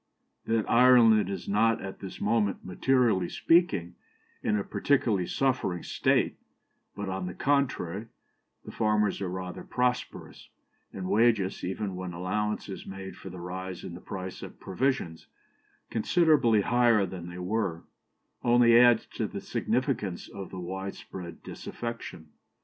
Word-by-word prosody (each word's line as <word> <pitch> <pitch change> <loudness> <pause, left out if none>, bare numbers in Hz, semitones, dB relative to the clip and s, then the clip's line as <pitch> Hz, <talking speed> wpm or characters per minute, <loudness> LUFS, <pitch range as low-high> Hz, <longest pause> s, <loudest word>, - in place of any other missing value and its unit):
"... - - -48
That 115 -1 +1
Ireland 115 -4 +6
is 100 - -5
not 115 +3 +3
at 95 -1 -7
this 95 -2 -8
moment, 105 -4 0
materially 110 -2 +2
speaking, 105 - +2 0.5
in 105 - +1
a 100 - -1
particularly 110 -11 +1
suffering 125 -10 0
state, - - +1 0.6
but, 100 -1 -4
on 95 -1 -3
the 90 - -6
contrary, 120 -8 0 0.6
the - - -7
farmers 105 -3 +1
are 95 - -2
rather 90 0 -5
prosperous, 125 0 -2 0.4
and 95 -1 -5
wages, 105 -3 +2
even 95 +1 -3
when 90 -1 -5
allowance 105 +5 -2
is 95 - -8
made 95 0 -7
for 95 - -9
the 90 0 -9
rise 90 +1 -6
in - - -7
the 90 - -9
price 95 -1 -6
of - - -10
provisions, 95 -5 -2 0.6
considerably 120 - +3
higher 120 -2 +3
than 90 -2 -7
they 90 - -8
were, 90 -2 -2 0.6
only 120 -1 +6
adds 120 -2 +6
to - - 0
the - - -6
significance - - -2
of 95 -1 -8
this - - -9
widespread 90 -1 -7
disaffection. 115 -9 -7
100 Hz, 140 wpm, -28 LUFS, 90-115 Hz, 0.6 s, Ireland